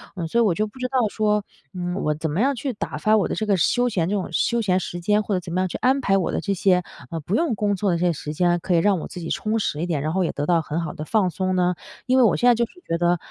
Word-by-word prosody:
嗯， 170 Hz, -3 st, -3 dB
所 235 Hz, +8 st, +1 dB
以 -, -, +5 dB
我 195 Hz, -6 st, +3 dB
就 215 Hz, +3 st, 0 dB
不 210 Hz, -, -16 dB
知 255 Hz, -, -1 dB
道 260 Hz, 0 st, 0 dB
说。 210 Hz, -1 st, +1 dB, 0.3 s
嗯， 180 Hz, 0 st, -3 dB
我 150 Hz, -, +1 dB
怎 160 Hz, 0 st, -3 dB
么 175 Hz, -, 0 dB
样 275 Hz, +3 st, +3 dB
去 260 Hz, +1 st, -3 dB
打 -, -, -5 dB
发 215 Hz, 0 st, +3 dB
我 200 Hz, -, +1 dB
的 -, -, -3 dB
这 215 Hz, -, -2 dB
个 200 Hz, -2 st, +3 dB
休 245 Hz, +8 st, +2 dB
闲 175 Hz, -7 st, 0 dB
这 205 Hz, -, 0 dB
种 190 Hz, -, -2 dB
休 235 Hz, -1 st, +1 dB
闲 190 Hz, -3 st, +2 dB
时 175 Hz, -1 st, -5 dB
间， 210 Hz, +3 st, +2 dB
或 205 Hz, -, -2 dB
者 180 Hz, -, +1 dB
怎 170 Hz, -1 st, -9 dB
么 185 Hz, -, 0 dB
样 185 Hz, -, +1 dB
去 -, -, -5 dB
安 265 Hz, +2 st, +3 dB
排 195 Hz, -4 st, +2 dB
我 185 Hz, -, 0 dB
的 -, -, -1 dB
这 200 Hz, -, -1 dB
些， 180 Hz, -1 st, +2 dB, 0.3 s
呃， 165 Hz, -, -4 dB
不 175 Hz, +6 st, -5 dB
用 320 Hz, -8 st, +1 dB
工 205 Hz, 0 st, 0 dB
作 195 Hz, +1 st, 0 dB
的 170 Hz, -, +1 dB
这 175 Hz, -, 0 dB
些 175 Hz, -, +2 dB
时 150 Hz, 0 st, -6 dB
间， 175 Hz, +2 st, +2 dB
可 175 Hz, -, 0 dB
以 -, -, +4 dB
让 195 Hz, 0 st, +2 dB
我 -, -, -6 dB
自 -, -, -8 dB
己 165 Hz, -, -5 dB
充 215 Hz, +1 st, -1 dB
实 155 Hz, -6 st, -2 dB
一 -, -, 0 dB
点， 155 Hz, -5 st, -1 dB
然 155 Hz, -, -1 dB
后 190 Hz, 0 st, +1 dB
也 -, -, -1 dB
得 145 Hz, -, -2 dB
到 170 Hz, -1 st, +3 dB
很 155 Hz, +1 st, -3 dB
好 160 Hz, -, -4 dB
的 150 Hz, -, -6 dB
放 200 Hz, 0 st, +2 dB
松 185 Hz, +1 st, -1 dB
呢？ 180 Hz, 0 st, +2 dB, 0.3 s
因 255 Hz, 0 st, +2 dB
为 255 Hz, -, +6 dB
我 220 Hz, -, +4 dB
现 245 Hz, -, +2 dB
在 245 Hz, -, +7 dB
就 235 Hz, +1 st, +1 dB
是 -, -, -22 dB
觉 165 Hz, -, 0 dB
得， 175 Hz, +1 st, +2 dB
185 Hz, 365 characters per minute, -23 LUFS, 170-215 Hz, 0.3 s, 在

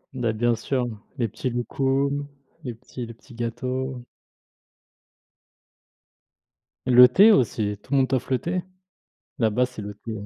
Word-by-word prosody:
Bah, 120 Hz, -3 st, 0 dB
bien 120 Hz, +2 st, +1 dB
sûr, 125 Hz, +2 st, -1 dB, 0.3 s
les 120 Hz, -, +1 dB
petits 120 Hz, +5 st, -4 dB
loukoum, 135 Hz, +4 st, 0 dB, 0.4 s
les 125 Hz, -4 st, -4 dB
petits 125 Hz, +1 st, -8 dB
les 115 Hz, -, -9 dB
petits 120 Hz, +3 st, -18 dB
gâteaux 125 Hz, +2 st, -3 dB, 2.8 s
Le 125 Hz, 0 st, +9 dB
thé 205 Hz, -, +7 dB
aussi, 105 Hz, -, +1 dB
tout -, -, -19 dB
le 140 Hz, -, +3 dB
monde 130 Hz, -, +3 dB
t'offre 130 Hz, 0 st, -1 dB
le 130 Hz, -, +2 dB
thé, 180 Hz, +1 st, -2 dB, 0.8 s
là-bas, 115 Hz, +2 st, +2 dB
c'est 125 Hz, -4 st, -9 dB
le 105 Hz, 0 st, -6 dB
thé 115 Hz, -, -5 dB
125 Hz, 140 wpm, -24 LUFS, 115-135 Hz, 2.8 s, Le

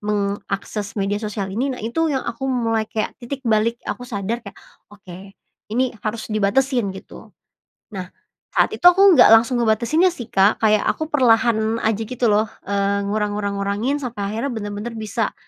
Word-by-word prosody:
meng 205 Hz, -1 st, -1 dB
akses 200 Hz, +1 st, -4 dB
media 205 Hz, +1 st, -1 dB
sosial 205 Hz, -3 st, -4 dB
ini, 250 Hz, +7 st, -1 dB
nah, 260 Hz, -, -3 dB
itu 320 Hz, +9 st, 0 dB
yang 270 Hz, -3 st, -1 dB
aku 265 Hz, +3 st, -4 dB
mulai 225 Hz, -4 st, 0 dB
kayak 215 Hz, -, -2 dB
titik 265 Hz, +3 st, -6 dB
balik 225 Hz, 0 st, +2 dB
aku 245 Hz, 0 st, -5 dB
sadar 220 Hz, +1 st, -3 dB
kayak, 200 Hz, -4 st, -12 dB, 0.3 s
"Oke 195 Hz, -1 st, -13 dB, 0.3 s
ini 250 Hz, +4 st, 0 dB
harus 215 Hz, +1 st, -4 dB
dibatasin," 230 Hz, +3 st, +1 dB
gitu. 190 Hz, -, -13 dB, 0.5 s
Nah, 185 Hz, -4 st, -6 dB, 0.5 s
saat -, -, +3 dB
itu -, -, 0 dB
aku 360 Hz, +2 st, +7 dB, 0.2 s
nggak 225 Hz, -, +9 dB
langsung 235 Hz, +2 st, +3 dB
ngebatasinnya 240 Hz, -, +2 dB
sih, 240 Hz, -6 st, -9 dB
Kak, 195 Hz, +3 st, +3 dB
kayak 215 Hz, -1 st, +3 dB
aku 315 Hz, 0 st, -1 dB
perlahan 230 Hz, -4 st, +2 dB
aja 220 Hz, 0 st, 0 dB
gitu 245 Hz, -2 st, 0 dB
loh, 210 Hz, +1 st, +3 dB, 0.2 s
eee, 200 Hz, 0 st, 0 dB
ngurang 205 Hz, +1 st, -1 dB
ngurang 200 Hz, -1 st, -3 dB
ngurangin, 205 Hz, +8 st, -1 dB
sampai 220 Hz, -7 st, -4 dB
akhirnya 230 Hz, +6 st, -2 dB
bener-bener 205 Hz, +1 st, -5 dB
bisa 220 Hz, 0 st, -3 dB
220 Hz, 170 wpm, -21 LUFS, 205-245 Hz, 0.5 s, nggak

